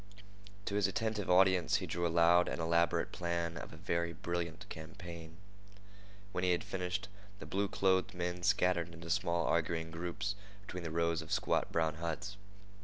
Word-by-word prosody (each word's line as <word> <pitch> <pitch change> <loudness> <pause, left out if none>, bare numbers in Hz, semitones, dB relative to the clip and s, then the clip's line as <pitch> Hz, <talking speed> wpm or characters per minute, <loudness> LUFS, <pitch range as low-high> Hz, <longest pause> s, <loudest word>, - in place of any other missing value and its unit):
To - - -3
his 100 -1 +3
attentive 105 +1 -1
audience 90 -2 +5
he - - 0
drew 85 0 0
a - - -1
loud 85 +1 +5
and - - -2
elaborate 85 +1 +2
plan 85 -1 -1
of 80 - -7
a 80 - -10
very 85 -1 -1
brilliant 85 +2 -3
campaign. 85 -1 -8 0.9
When 90 -2 -2
he 90 -1 +4
had 85 - -1
finished, 90 -1 -2 0.3
the - - -8
blue 100 +1 0
clothed 95 -1 +2
men 90 0 -2
scattered 90 -3 +2
into 85 0 -6
small 85 -2 +1
arguing 80 0 0
groups 85 +4 -2 0.3
between 90 -2 -5
the 85 - -4
rows 85 0 +1
of - - -10
squat - - +1
brown 80 -2 +1
huts. 85 +4 -3
85 Hz, 170 wpm, -34 LUFS, 85-90 Hz, 0.9 s, audience